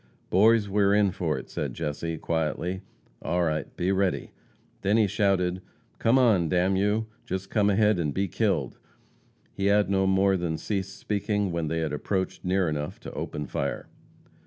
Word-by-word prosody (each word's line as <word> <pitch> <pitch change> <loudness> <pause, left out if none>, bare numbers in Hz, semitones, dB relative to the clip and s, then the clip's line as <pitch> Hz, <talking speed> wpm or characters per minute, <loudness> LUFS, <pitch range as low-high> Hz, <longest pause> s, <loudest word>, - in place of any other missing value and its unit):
"Boys, 105 +2 +5
we 100 +1 +1
are 100 0 +4
in 105 -2 +3
for - - -1
it," - - -7
said - - -4
Jesse, 80 +2 -3
quietly. 85 +4 -2 0.4
"All 90 0 0
right, 75 -3 -1
be 90 +2 +1
ready." 95 -1 0 0.5
Then 100 +3 +2
he 110 - +5
shouted: 95 -3 +1 0.4
"Come 115 +3 +4
on, 105 -10 +4
d 90 - 0
n 95 +2 +2
you! 105 +3 +1 0.2
Just 95 +1 -5
come 105 -2 +3
ahead 105 -1 +3
and 75 -4 0
be 95 +6 -1
killed!" - - -1 0.7
He 100 0 -1
had 100 0 +3
no 95 -1 +2
more 95 0 +3
than 85 -3 -2
ceased 95 0 -3
speaking 105 -1 -1
when 85 -2 -2
they 80 +2 -1
had 75 -2 -2
approached 95 +5 -2
near 95 0 +1
enough 75 -1 -3
to - - -8
open 75 - -4
fire. - - -3
95 Hz, 180 wpm, -27 LUFS, 85-100 Hz, 0.7 s, Boys